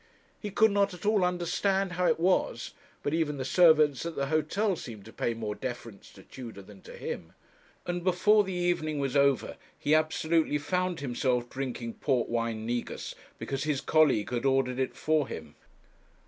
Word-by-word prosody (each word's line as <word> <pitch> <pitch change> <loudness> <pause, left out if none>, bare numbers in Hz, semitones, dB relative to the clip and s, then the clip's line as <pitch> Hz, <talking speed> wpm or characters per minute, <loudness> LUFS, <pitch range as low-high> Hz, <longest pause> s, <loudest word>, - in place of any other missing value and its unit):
He 210 - -5
could 220 +2 +4
not 200 -2 +2
at 180 - -11
all 210 -2 +3
understand 180 +2 0
how 180 0 +1
it - - +2
was, 180 +2 +1 0.3
but 145 - -1
even 155 -3 0
the 130 - -3
servants 155 -4 +5
at 170 -1 -5
the 140 - -1
hotel 160 +7 +1
seemed 110 - -9
to 115 - -12
pay 115 - -1
more 110 -2 -3
deference 120 -2 -7
to - - -15
Tudor 115 -6 -9
than 100 0 -15
to - - -11
him; - - -6 0.5
and 175 0 -3
before 205 +4 +4
the 190 - -5
evening 175 -4 0
was 140 -1 -2
over 140 -2 +2 0.2
he 150 - +1
absolutely 155 0 +2
found 180 +3 -1
himself 125 -2 -1
drinking 125 -3 -4
port 130 -5 0
wine 115 -1 -2
negus, 120 +1 -3 0.2
because 135 +1 -3
his 150 -3 0
colleague 145 -11 +3
had 120 -1 -1
ordered 135 -1 +1
it 130 - -1
for 155 -3 +1
him. 80 -2 -8
150 Hz, 175 wpm, -29 LUFS, 125-175 Hz, 0.5 s, servants